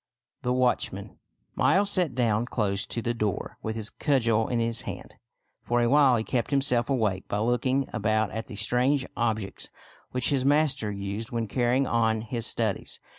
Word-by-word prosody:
THE 125 Hz, -, -1 dB
WATCHMAN 125 Hz, -1 st, -1 dB, 0.3 s
Miles 200 Hz, +1 st, +3 dB
sat 175 Hz, -9 st, +1 dB
down 120 Hz, -2 st, +1 dB
close 100 Hz, -5 st, -1 dB
to 115 Hz, -, -4 dB
the 120 Hz, -, 0 dB
door 105 Hz, -5 st, -3 dB
with 110 Hz, 0 st, -3 dB
his 110 Hz, -1 st, -2 dB
cudgel 115 Hz, -6 st, +1 dB
in 120 Hz, -, -1 dB
his 115 Hz, 0 st, 0 dB
hand. -, -, -7 dB, 0.5 s
For 120 Hz, 0 st, 0 dB
a 120 Hz, -1 st, +2 dB
while 140 Hz, -2 st, +5 dB
he 110 Hz, -, -1 dB
kept 120 Hz, 0 st, -1 dB
himself 135 Hz, -4 st, +2 dB
awake 110 Hz, -8 st, 0 dB
by 100 Hz, -, -2 dB
looking 125 Hz, +4 st, +1 dB
about 110 Hz, -2 st, +1 dB
at 110 Hz, +1 st, -5 dB
the 110 Hz, -, -8 dB
strange 125 Hz, +6 st, +1 dB
objects 110 Hz, -4 st, -2 dB, 0.4 s
which 125 Hz, -1 st, 0 dB
his 135 Hz, -3 st, +1 dB
master 140 Hz, -6 st, +2 dB
used 100 Hz, +3 st, -5 dB
when 115 Hz, -3 st, -2 dB
carrying 125 Hz, +4 st, +1 dB
on 110 Hz, -2 st, +1 dB
his 115 Hz, 0 st, -2 dB
studies. 110 Hz, -4 st, -2 dB
120 Hz, 175 wpm, -27 LUFS, 110-130 Hz, 0.5 s, while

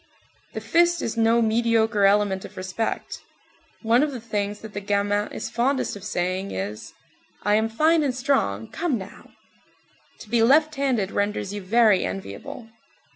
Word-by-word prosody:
The -, -, -5 dB
fist 345 Hz, 0 st, +2 dB
is 230 Hz, -, -2 dB
no 230 Hz, +1 st, +3 dB
mediocre 225 Hz, -2 st, +2 dB
element 200 Hz, -1 st, +2 dB
of -, -, -11 dB
respect. 190 Hz, +4 st, -4 dB, 0.6 s
One 230 Hz, +3 st, +4 dB
of 300 Hz, 0 st, +1 dB
the 250 Hz, -, -5 dB
things 210 Hz, -2 st, -3 dB
that 220 Hz, -1 st, -10 dB
the 205 Hz, -, -4 dB
gamin 205 Hz, +1 st, 0 dB
is 225 Hz, -, -6 dB
fondest 255 Hz, +1 st, 0 dB
of 200 Hz, -, -10 dB
saying 185 Hz, -1 st, -2 dB
is: 100 Hz, +3 st, -6 dB, 0.5 s
"I 205 Hz, -, +2 dB
am 220 Hz, +1 st, +2 dB
fine 315 Hz, +8 st, +3 dB
and 275 Hz, -4 st, 0 dB
strong, 250 Hz, -, 0 dB
come 325 Hz, -7 st, -2 dB
now!" 195 Hz, -1 st, -11 dB, 0.9 s
To -, -, -11 dB
be 235 Hz, -1 st, +3 dB
left 300 Hz, +6 st, +4 dB
handed 260 Hz, -9 st, 0 dB
renders 205 Hz, -1 st, -2 dB
you 205 Hz, -, -5 dB
very 210 Hz, 0 st, +4 dB
enviable. 235 Hz, +5 st, -6 dB
220 Hz, 160 wpm, -24 LUFS, 200-250 Hz, 0.9 s, One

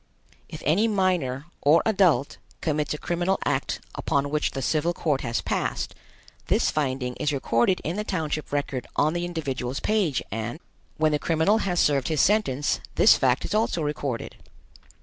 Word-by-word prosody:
If 155 Hz, -, -8 dB
any 195 Hz, +9 st, +3 dB
minor 180 Hz, -, 0 dB, 0.2 s
or 155 Hz, +4 st, +5 dB
adult 190 Hz, -9 st, +2 dB, 0.2 s
commits 150 Hz, -2 st, -1 dB
a -, -, -5 dB
criminal 175 Hz, +4 st, 0 dB
act 135 Hz, -1 st, -1 dB
upon 140 Hz, 0 st, -1 dB
which 150 Hz, 0 st, +1 dB
the 135 Hz, -, -5 dB
civil 160 Hz, +5 st, +1 dB
court 150 Hz, -5 st, 0 dB
has 115 Hz, -2 st, -2 dB
passed, -, -, -2 dB, 0.5 s
this -, -, +2 dB
finding 130 Hz, -4 st, -1 dB
is 150 Hz, -1 st, 0 dB
recorded 135 Hz, +4 st, +1 dB
in 170 Hz, +5 st, -3 dB
the 210 Hz, -, -1 dB
township 155 Hz, -6 st, -3 dB
record 140 Hz, -3 st, -2 dB
on 155 Hz, +2 st, +2 dB
the 175 Hz, 0 st, -2 dB
individual's 135 Hz, -7 st, -3 dB
page 195 Hz, -, 0 dB
and, 115 Hz, +6 st, -4 dB, 0.4 s
when 155 Hz, -1 st, +2 dB
the 150 Hz, -, +1 dB
criminal 165 Hz, +8 st, +2 dB
has 180 Hz, -4 st, 0 dB
served 140 Hz, -3 st, +2 dB
his 155 Hz, -3 st, 0 dB
sentence, 150 Hz, -9 st, +2 dB, 0.2 s
this -, -, +7 dB
fact 130 Hz, -1 st, +1 dB
is -, -, -4 dB
also 210 Hz, -6 st, +1 dB
recorded. 145 Hz, -5 st, -3 dB
150 Hz, 165 wpm, -25 LUFS, 135-175 Hz, 0.5 s, this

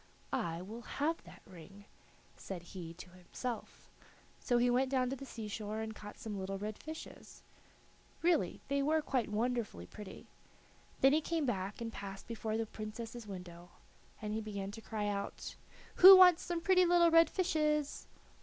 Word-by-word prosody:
"I 175 Hz, -10 st, -2 dB
will 220 Hz, +5 st, -8 dB
have 305 Hz, +7 st, -2 dB
that -, -, -14 dB
ring," 190 Hz, +3 st, -13 dB, 0.5 s
said 180 Hz, -3 st, -7 dB
he 175 Hz, -1 st, -8 dB
to 180 Hz, +1 st, -11 dB
himself. 185 Hz, +7 st, -7 dB, 0.5 s
So 245 Hz, -, +1 dB
he 240 Hz, +1 st, +3 dB
went 255 Hz, +2 st, +2 dB
down 255 Hz, -2 st, +1 dB
to -, -, -1 dB
the 275 Hz, +1 st, -9 dB
sea 225 Hz, -3 st, -6 dB
shore 210 Hz, +1 st, -4 dB
and 220 Hz, 0 st, -4 dB
caught 210 Hz, -1 st, -10 dB
some 210 Hz, -3 st, -5 dB
little 195 Hz, +1 st, -3 dB
red 210 Hz, +1 st, -5 dB
fishes. 315 Hz, +1 st, -10 dB, 0.8 s
Really, 330 Hz, -, +2 dB
they 280 Hz, +1 st, +1 dB
were 310 Hz, +2 st, +2 dB
quite 255 Hz, -7 st, 0 dB
wonderfully 220 Hz, -, -2 dB
pretty. 200 Hz, -, -10 dB, 0.8 s
Then 270 Hz, +1 st, +6 dB
he 310 Hz, -, +3 dB
came 325 Hz, -1 st, -1 dB
back, 200 Hz, -3 st, -3 dB
and, 225 Hz, -1 st, -4 dB
passing 195 Hz, -1 st, -7 dB
before 220 Hz, -1 st, -3 dB
the 225 Hz, -, -1 dB
Princess's 220 Hz, +2 st, -7 dB
window, 175 Hz, -3 st, -9 dB, 0.5 s
he 215 Hz, +1 st, -3 dB
began 200 Hz, -2 st, -5 dB
to 225 Hz, +2 st, -9 dB
cry 215 Hz, -1 st, -3 dB
out: 200 Hz, -1 st, -4 dB, 0.4 s
"Who 380 Hz, +1 st, +12 dB
wants 360 Hz, -2 st, +8 dB
some 345 Hz, -1 st, -3 dB
pretty 365 Hz, +1 st, +5 dB
little 345 Hz, -1 st, +5 dB
red 330 Hz, 0 st, +6 dB
fishes?" 305 Hz, -5 st, 0 dB
225 Hz, 165 wpm, -34 LUFS, 200-280 Hz, 0.8 s, Who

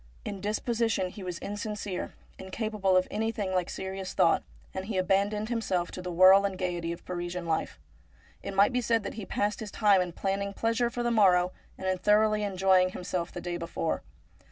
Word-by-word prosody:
In 200 Hz, -2 st, -5 dB
disposition 220 Hz, -1 st, 0 dB
he 200 Hz, -, -10 dB
was 180 Hz, -2 st, -4 dB
insincere, 205 Hz, -2 st, -5 dB, 0.2 s
incapable 195 Hz, -1 st, 0 dB
of 185 Hz, -, +2 dB
anything 220 Hz, -3 st, -2 dB
like 180 Hz, -2 st, 0 dB
serious 190 Hz, 0 st, -5 dB
thought, -, -, +4 dB, 0.3 s
and 190 Hz, 0 st, -4 dB
he 205 Hz, -2 st, -3 dB
abandoned 200 Hz, +3 st, +1 dB
himself 190 Hz, -7 st, -1 dB
to 185 Hz, -, -6 dB
the 180 Hz, 0 st, -5 dB
whirl 185 Hz, +3 st, +7 dB
and 195 Hz, -2 st, -1 dB
gaiety 175 Hz, -2 st, -2 dB
of 170 Hz, -, -8 dB
Parisian 175 Hz, 0 st, -4 dB
life. 160 Hz, -1 st, -1 dB, 0.6 s
It 200 Hz, -, -6 dB
might 200 Hz, +5 st, +4 dB
be 250 Hz, -, +1 dB
said 230 Hz, -1 st, +1 dB
that -, -, -5 dB
he 210 Hz, -3 st, -7 dB
passed 205 Hz, +1 st, -1 dB
his 220 Hz, -, -5 dB
time 205 Hz, -3 st, +4 dB
in 180 Hz, -1 st, -2 dB
planning 200 Hz, +2 st, -2 dB
pleasure 230 Hz, +1 st, +1 dB
for 240 Hz, 0 st, -3 dB
the 240 Hz, -, +1 dB
morrow 185 Hz, -5 st, +4 dB, 0.3 s
and -, -, -7 dB
in 185 Hz, -1 st, 0 dB
thoroughly 210 Hz, +1 st, +3 dB
enjoying 190 Hz, -2 st, +3 dB
himself 180 Hz, -1 st, -3 dB
the 175 Hz, -, -6 dB
day 175 Hz, 0 st, -3 dB
before. 170 Hz, -1 st, -2 dB
195 Hz, 190 wpm, -29 LUFS, 185-210 Hz, 0.6 s, whirl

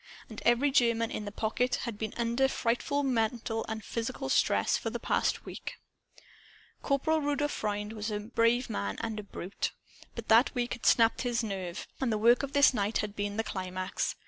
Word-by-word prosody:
And 215 Hz, -, -8 dB
every 245 Hz, +4 st, +4 dB
German 235 Hz, -4 st, +2 dB
in 210 Hz, -, -4 dB
the 205 Hz, -, -5 dB
"Pocket" 225 Hz, +4 st, 0 dB
had 225 Hz, -4 st, -5 dB
been 220 Hz, -1 st, -4 dB
under 235 Hz, +3 st, +2 dB
frightful 265 Hz, +3 st, 0 dB
mental 225 Hz, -3 st, 0 dB
and 220 Hz, -1 st, -5 dB
physical 260 Hz, +3 st, -3 dB
stress, -, -, +3 dB
for -, -, -2 dB
the -, -, -4 dB
past -, -, 0 dB
week. -, -, -7 dB, 1.1 s
Corporal 310 Hz, +3 st, +1 dB
Rudolph 290 Hz, 0 st, 0 dB
Freund 210 Hz, +1 st, -3 dB
was 215 Hz, 0 st, -4 dB
a 210 Hz, -1 st, -2 dB
brave 230 Hz, +3 st, +1 dB
man 100 Hz, 0 st, -3 dB
and 225 Hz, -2 st, -3 dB
a -, -, -6 dB
brute. 195 Hz, -1 st, -4 dB, 0.4 s
But 230 Hz, -1 st, -7 dB
that 230 Hz, +5 st, +5 dB
week 245 Hz, -1 st, -1 dB
had 240 Hz, -, -3 dB
sapped 230 Hz, -1 st, +4 dB
his 240 Hz, -1 st, 0 dB
nerve. 190 Hz, -4 st, -4 dB
And 260 Hz, -3 st, 0 dB
the 215 Hz, -, +1 dB
work 235 Hz, +3 st, +5 dB
of 280 Hz, 0 st, -5 dB
this 285 Hz, -2 st, +6 dB
night 210 Hz, -1 st, 0 dB
had 210 Hz, -1 st, -3 dB
been 205 Hz, 0 st, -3 dB
the 225 Hz, -, +1 dB
climax. 185 Hz, -2 st, -3 dB
230 Hz, 190 wpm, -30 LUFS, 210-250 Hz, 1.1 s, this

